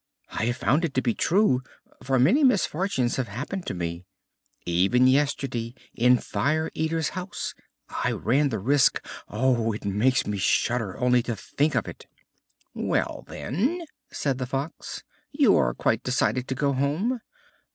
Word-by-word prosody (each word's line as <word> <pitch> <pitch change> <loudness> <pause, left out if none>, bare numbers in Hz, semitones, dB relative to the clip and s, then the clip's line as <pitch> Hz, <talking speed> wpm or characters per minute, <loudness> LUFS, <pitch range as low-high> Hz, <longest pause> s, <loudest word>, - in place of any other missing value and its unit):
I 110 - -2
have 120 +1 -1
found 145 +8 +2
it 160 -5 -2
to 130 - +3
be 120 - +1
true, 175 - +2 0.4
for 130 0 +1
many 195 - +4
misfortunes 190 - +1
have 130 -3 -1
happened 145 - -5
to - - -3
me. 85 0 -4 0.6
Even 95 +9 +3
yesterday 130 -3 +1 0.2
in 125 +1 +4
Fire 155 +5 -1
Eater's 160 0 -1
house 185 0 -5 0.3
I - - -2
ran 140 +5 +1
the 110 - -2
risk 135 +7 +2 0.2
Oh! 115 -1 +1
it 105 - -7
makes 110 +6 +2
me 105 -1 -3
shudder 115 +1 +1
only 125 -1 +3
to 115 -1 -3
think 145 +8 -1
of 115 - 0
it!" - - -10 0.7
"Well, - - -1
then," 275 - -2 0.2
said 135 -3 -2
the 125 - -3
Fox, 140 +4 -5 0.3
"you - - +4
are - - +2
quite 110 +1 +1
decided 125 -1 0
to 130 - -2
go 140 +1 +1
home? 160 - 0
130 Hz, 155 wpm, -26 LUFS, 115-150 Hz, 0.7 s, many